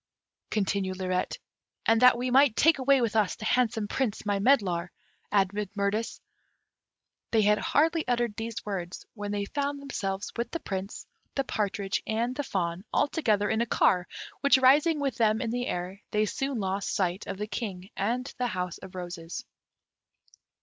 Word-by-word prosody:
continued 195 -2 -1
Lirette. 185 -1 -1 0.5
"And 225 +1 +4
that 250 -1 +7
we 250 +1 -1
might 265 -2 +5
take 320 -2 +4
away 270 0 +4
with 230 -2 0
us 210 -4 +2
the 220 - -8
handsome 225 -3 +1
Prince, 230 -3 -2
my 205 -1 +1
medlar!" 195 -7 +2 0.4
added 200 0 +1
Mirtis. 200 +3 -1 1.1
They 220 -2 +3
had 210 +1 +4
hardly 320 +1 +2
uttered 240 -3 0
these 225 0 -5
words 185 -4 -5
when 205 -2 -5
they 205 -1 -1
found 285 +4 -2
themselves 200 -8 -3
with 235 0 -2
the 335 - -4
Prince, 195 -4 -5 0.3
the 275 - +1
partridge, 200 -4 -1
and 235 +3 -1
the 290 - -1
fawn, 180 -8 -2
all 290 - +2
together 215 -11 +1
in 220 +2 +1
a 235 - 0
car, 180 -4 +3 0.3
which 280 -1 +5
rising 290 +5 +5
with 280 -2 -1
them 220 -2 +3
in 230 -3 -2
the 245 +1 -2
air, 180 +3 -4
they 210 0 +2
soon 270 +2 -2
lost 195 0 -2
sight 185 0 -1
of - - -4
the 210 - -2
King 200 -4 -5
and 245 +6 -1
the 250 - +1
House 180 -5 -3
of 190 0 -11
Roses. 175 -2 -6
215 Hz, 170 wpm, -28 LUFS, 195-250 Hz, 1.1 s, that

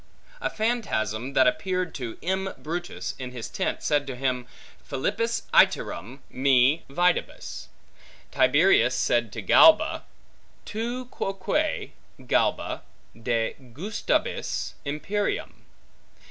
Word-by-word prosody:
A - - 0
phantasm 140 - -1
that 130 -1 +5
appeared 180 +6 0
to 120 -4 -6
M. 190 +2 -1
Brutus, 175 +3 -4
in 125 -1 -6
his 120 -3 -6
tent, - - -2
said 145 -2 +1
to 135 - -4
him, 125 -1 -1 0.4
Philippis 210 - -1
iterum 135 +3 +2
me 135 +3 +3
videbis. 175 +5 -1 0.6
Tiberius 395 +1 +4
said - - +1
to - - -5
Galba, 320 -1 +6 0.6
Tu 240 +4 -3
quoque, 235 +8 -2 0.3
Galba, - - +1 0.3
degustabis 120 - -2
imperium. 195 +9 -3
155 Hz, 95 wpm, -26 LUFS, 130-205 Hz, 0.6 s, Galba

